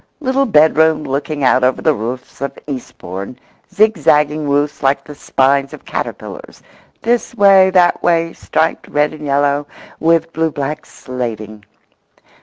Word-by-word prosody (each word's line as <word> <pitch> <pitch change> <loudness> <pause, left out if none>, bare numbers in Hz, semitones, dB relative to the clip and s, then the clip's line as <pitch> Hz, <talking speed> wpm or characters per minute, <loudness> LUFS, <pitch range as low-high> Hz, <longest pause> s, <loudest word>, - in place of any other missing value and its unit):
little 270 -1 0
bedroom 160 -3 +4
looking 140 +2 -3
out 130 0 +3
over 130 0 +2
the 155 - +2
roofs 125 +2 -6
of 140 0 -4
Eastbourne—zigzagging 150 - -1
roofs 145 +1 0
like 135 0 +1
the 150 - -10
spines 140 0 +1
of - - -12
caterpillars, - - -7 0.4
this 240 +1 0
way, 195 -3 +6
that 180 -2 +3
way, 165 -1 +1
striped 160 +1 -1
red 150 +1 0
and 155 -1 -10
yellow, 145 +1 +1 0.3
with 165 +1 +1
blue 160 0 0
black 150 +1 -5
slating]. 110 -4 -6
150 Hz, 130 wpm, -16 LUFS, 135-165 Hz, 0.4 s, way